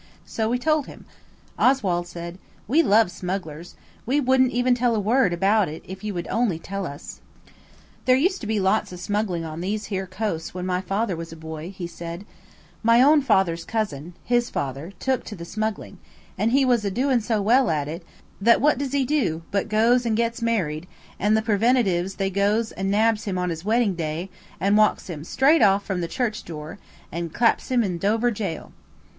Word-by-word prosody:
So 220 -1 -2
we 245 - +1
told 305 +2 +1
him. - - -12 0.5
Oswald 190 -10 +2
said– 170 +1 -8 0.3
"We 290 +9 +4
love 215 - +4
smugglers. 175 -3 -5 0.3
We 265 +5 +1
wouldn't 260 -1 +3
even 245 +1 +2
tell 245 -1 +1
a - - +1
word 225 +1 +2
about 195 +2 +2
it 155 - -8
if 190 +2 -8
you 210 -2 -3
would 175 - -4
only 225 -8 0
tell 195 +2 -5
us." 140 +1 -9 0.8
"There 255 - +5
used 365 +8 +1
to 220 - -5
be 215 -1 0
lots 195 +2 +1
of 180 - -8
smuggling 190 -3 -2
on 160 +1 -6
these 210 +4 -2
here 190 0 -2
coasts 185 -3 -4
when 180 0 -4
my 180 0 0
father 195 +1 -1
was 165 0 -7
a - - -8
boy," 160 +1 -7
he 190 -2 -7
said; 170 +2 -7 0.6
"my 230 +1 +5
own 295 +4 +6
father's 190 -9 +2
cousin, 175 -7 -3
his 240 0 +1
father 140 +5 -4
took 260 -2 -1
to 210 - -7
the 170 -2 -8
smuggling, 215 -1 -4 0.4
and 215 +4 0
he 270 +1 +4
was 240 -4 +2
a 200 - 0
doin' 250 +4 +1
so 220 0 0
well 240 +6 +3
at 150 -3 0
it, 165 +4 -6 0.4
that 230 +3 +5
what 290 -2 +3
does 280 -1 -3
he 275 -2 +2
do, 245 - 0
but 200 +2 -1
goes 230 +3 +3
and 225 -2 0
gets 235 0 -1
married, 180 -8 -1 0.3
and 210 +2 +3
the 220 - 0
Preventives 205 -4 +2
they 195 0 -1
goes 205 +3 +1
and 195 0 -3
nabs 215 +1 +2
him 195 -3 -2
on 180 -1 -1
his 165 0 -5
wedding 220 0 +2
day, 165 +2 -4 0.3
and 200 +4 +3
walks 215 -3 +2
him 150 -3 -7
straight 280 - +3
off 200 -1 +4
from 190 -3 -2
the 170 - -2
church 220 +2 -2
door, 160 +3 -8 0.3
and 170 -1 -5
claps 230 0 +2
him 250 -2 +3
in 180 -4 -2
Dover 225 +5 +1
Jail." 195 -7 -5
205 Hz, 200 wpm, -24 LUFS, 175-235 Hz, 0.8 s, own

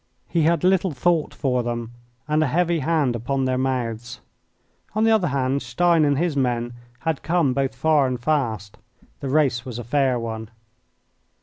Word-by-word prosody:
He 170 - 0
had 165 +1 +2
little 185 0 +3
thought 160 +2 +1
for 125 -2 0
them 120 -1 -4 0.4
and 155 +1 +2
a 155 - +2
heavy 170 +3 +1
hand 150 -4 +1
upon 130 +3 -1
their 130 0 0
mouths. 120 -3 -2 0.8
On 215 - +2
the 225 - +4
other 215 -5 +3
hand, 135 0 0
Stein 160 +7 +2
and 145 -1 +2
his 170 -1 0
men 120 -3 0 0.3
had 160 -3 -1
come 165 -6 +1
both 135 0 -1
far 145 +1 +3
and 125 -1 -2
fast. 115 -8 -1 0.4
The 135 - -4
race 135 -5 +2
was 125 -4 -7
a 120 - -5
fair 130 +1 +1
one. 110 -2 -5
135 Hz, 175 wpm, -23 LUFS, 120-160 Hz, 0.8 s, the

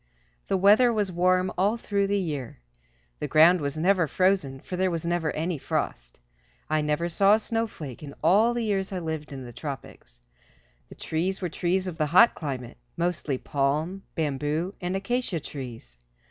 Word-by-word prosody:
The 195 - +1
weather 210 +6 +6
was 210 -4 0
warm 185 +1 +2
all 205 +5 +2
through 200 -3 0
the 200 +1 +1
year. 150 -10 -4 0.6
The - - -2
ground 165 +3 +6
was 140 +1 -3
never 180 0 +3
frozen, 185 -6 +1
for 185 - -6
there 185 +1 +1
was 170 -2 -3
never 170 -2 0
any 160 0 -2
frost. - - -3 0.5
I 155 0 +2
never 150 +3 0
saw 195 +4 +4
a - - 0
snowflake 215 - -4
in 145 -2 -9
all 215 +8 +4
the 240 - -1
years 195 -3 -1
I 190 - -3
lived 160 -3 -4
in 135 -2 -7
the 120 - -10
tropics. 135 - -8 0.7
The - - -12
trees 180 +4 -2
were 180 - -2
trees 180 +3 0
of 170 -3 -6
the 155 - +2
hot 185 +10 +6
climate, 130 -6 -6 0.2
mostly 170 -5 -1
palm, 150 +8 -1
bamboo 155 +3 -1
and 180 +1 -2
acacia 200 -2 -1
trees. 120 - -8
170 Hz, 175 wpm, -26 LUFS, 150-195 Hz, 0.7 s, weather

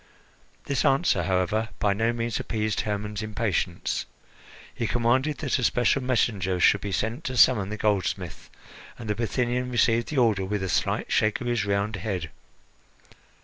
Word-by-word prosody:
This 140 -2 0
answer, 135 - +3
however, 95 +4 0
by 100 -1 +2
no 110 +3 +1
means 120 0 -2
appeased 110 -2 -1
Hermon's 105 -1 -3
impatience. 105 -5 -2 0.7
He 115 - -2
commanded 125 +6 +1
that 140 -5 -1
a - - -2
special 125 +3 +2
messenger 105 -7 0
should 100 +3 +4
be 100 - -4
sent 110 - -2
to 130 -5 -3
summon 100 -4 +5
the 110 - -4
goldsmith, 105 -4 -2 0.5
and 115 - -8
the 105 - +1
Bithynian 120 +3 -1
received 115 -1 +2
the 150 - -4
order 110 -6 +3
with 100 +1 -2
a 95 - -2
slight - - -1
shake 110 0 +2
of 125 - -6
his 120 -3 0
round 100 +1 0
head. 90 -5 -4
110 Hz, 160 wpm, -26 LUFS, 100-120 Hz, 0.7 s, summon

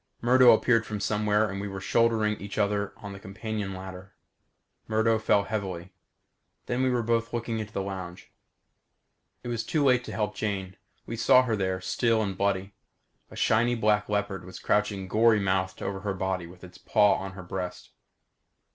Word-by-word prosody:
Murdo 125 +1 +6
appeared 115 0 +3
from 105 -2 -5
somewhere 105 +1 +1
and 100 0 -5
we 100 - -4
were 95 -1 -6
shouldering 110 0 +2
each 100 0 -7
other 100 -1 0
on 100 -1 -8
the 100 - -9
companion 105 0 -5
ladder. 95 +1 -9 0.7
Murdo 110 0 +2
fell 105 -1 +3
heavily. 95 -4 -4 0.7
Then 120 +1 -1
we 130 - +2
were 125 -2 0
both 115 0 0
looking 115 -1 -2
into 105 -1 -6
the 95 - -3
lounge. 95 -2 -7 1.1
It 120 - -5
was 115 -1 -2
too 155 -5 0
late 125 -2 +4
to - - -7
help 105 -1 -2
Jane. 95 -3 -3 0.3
We 115 - -5
saw 125 +3 +6
her 115 -3 0
there, 95 -2 -1
still 115 +3 +1
and 100 -2 -3
bloody. 100 0 -1 0.6
A - - -12
shiny 120 +2 +2
black 105 -2 +1
leopard 105 -3 -1
was 90 +1 -10
crouching 100 -2 0
gory 110 +2 +4
mouthed 95 -1 -1
over 95 0 -3
her 100 0 -3
body 95 -2 -2
with 90 +1 -15
its 90 -1 -12
paws 105 -3 +3
on 95 0 -6
her 95 -1 -9
breast. 90 0 -6
105 Hz, 180 wpm, -27 LUFS, 95-110 Hz, 1.1 s, Murdo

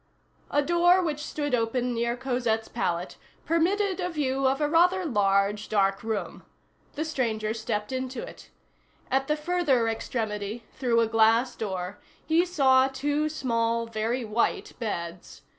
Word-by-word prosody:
A 290 - +2
door 350 +3 +4
which 300 -3 -2
stood 290 -2 -3
open 245 +1 0
near 235 +1 -1
Cosette's 240 -4 -1
pallet 175 +1 -2 0.3
permitted 380 +4 +1
a 360 -1 -1
view 270 -4 0
of 270 +2 +1
a 295 - +2
rather 355 +4 +3
large, 205 -4 +1
dark 195 -2 +2
room. 220 -3 -4 0.5
The 310 - -2
stranger 225 -8 -1
stepped 210 -1 -3
into 260 - -3
it. - - -13 0.6
At 270 +1 +1
the 300 - +1
further 300 -7 +1
extremity, 220 -1 -3
through 240 -3 +2
a 230 - +2
glass 225 +2 +3
door, 190 -2 -4 0.3
he 335 +3 +3
saw 265 -6 +4
two 290 +3 -1
small, 230 -5 0
very 230 +2 -2
white 220 +2 -1
beds. 175 -6 -5
250 Hz, 140 wpm, -27 LUFS, 220-295 Hz, 0.6 s, door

